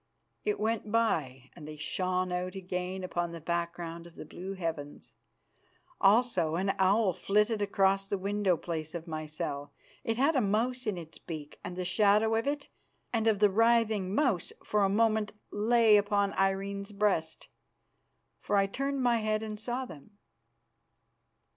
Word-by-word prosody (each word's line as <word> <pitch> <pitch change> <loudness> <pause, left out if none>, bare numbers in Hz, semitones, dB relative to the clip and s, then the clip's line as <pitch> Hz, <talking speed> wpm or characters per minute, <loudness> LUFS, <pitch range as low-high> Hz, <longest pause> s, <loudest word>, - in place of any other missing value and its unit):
It 420 0 -1
went 220 -1 -1
by, 140 - 0
and 150 -3 -10
they 155 - -7
shone 185 +4 -1
out 180 +1 -2
again 185 0 -4
upon 175 -1 -2
the 170 - -6
background 170 0 -3
of 170 - -17
the - - -8
blue 190 +2 -7
heavens. 160 -6 -5 0.9
Also 195 -6 +3
an 195 +3 +1
owl 195 +1 +3
flitted 210 +4 +1
across 195 -1 +2
the 200 - -1
window 200 -2 +1
place 160 -1 -5
of 170 -1 -5
my 155 -1 -4
cell. 145 -1 -5 0.3
It 225 0 -1
had 285 +5 +3
a 260 - +4
mouse 235 +4 0
in 205 -4 0
its 165 -2 -9
beak, 155 -3 -8
and 180 - -6
the 180 0 -3
shadow 210 +4 +3
of 225 +3 0
it 285 0 -2 0.5
and 225 -1 +1
of 220 -2 +4
the 205 0 +4
writhing 220 -3 +2
mouse 245 - +1
for 210 -1 +1
a 195 - +3
moment 215 0 +2 0.2
lay 220 0 +5
upon 205 -1 +1
Irene's 195 +1 -1
breast, 200 -6 0 0.9
for 205 - -1
I 195 - +4
turned 275 +6 -2
my 240 -1 +4
head 215 0 0
and 215 -1 -5
saw 245 +4 -3
them. 205 - -13
195 Hz, 160 wpm, -30 LUFS, 175-220 Hz, 0.9 s, lay